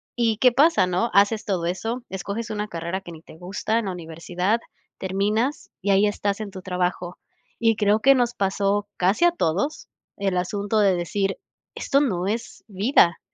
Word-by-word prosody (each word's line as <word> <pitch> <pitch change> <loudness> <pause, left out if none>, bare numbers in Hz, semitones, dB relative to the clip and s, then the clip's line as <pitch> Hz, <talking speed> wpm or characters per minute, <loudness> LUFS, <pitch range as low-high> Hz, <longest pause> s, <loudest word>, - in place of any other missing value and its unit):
¿y 230 -3 +1
qué 250 +3 +5
pasa? 290 - +4
¿No? 185 +6 0
Haces 205 +2 +3
todo 185 -4 -1
eso, 225 +8 -3
escoges 200 +5 -4
una 210 -1 -3
carrera 170 0 -4
que 175 - -10
ni 160 - -12
te 160 - -15
gusta 195 +5 -2
en 230 - -4
la 195 - -2
universidad, 175 +5 -2 0.4
terminas 210 +8 -1
y 200 +1 +1
ahí 195 +2 +4
estás 205 0 -2
en 210 - -5
tu 190 - -8
trabajo, 180 -1 -2 0.4
y 225 -1 +4
creo 210 0 +2
que 275 +4 +6
nos 245 -1 +1
pasó 200 +1 0
casi 195 - +3
a 345 - +5
todos 280 - -1 0.3
el 195 -2 -1
asunto 205 +4 -1
de 195 -3 +4
decir 195 +3 -1 0.4
esto 275 - +1
no 185 -11 0
es 225 +4 -4
vida, 195 -4 +3
200 Hz, 180 wpm, -24 LUFS, 180-225 Hz, 0.4 s, que